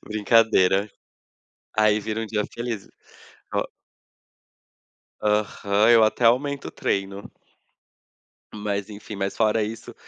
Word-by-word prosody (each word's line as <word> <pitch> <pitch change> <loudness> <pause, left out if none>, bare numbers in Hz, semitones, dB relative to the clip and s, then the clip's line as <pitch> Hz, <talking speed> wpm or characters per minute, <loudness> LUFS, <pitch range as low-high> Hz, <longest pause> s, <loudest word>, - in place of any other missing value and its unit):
Brincadeira. 105 -2 +3 0.9
Aí 105 0 +4
vira 110 +1 -4
um 115 - -4
dia 105 -1 -1
feliz. 120 -4 -4 0.7
O - - +1 1.6
Aham, 105 0 +1
eu 115 -1 +7
até 110 +2 +1
aumento 140 +4 +2
o - - -7
treino. 100 0 -3 1.2
Mas 105 -1 -3
enfim 105 0 -9
mas 100 0 -3
fora 110 0 +2
isso 110 +1 -7
105 Hz, 105 wpm, -24 LUFS, 100-115 Hz, 1.6 s, eu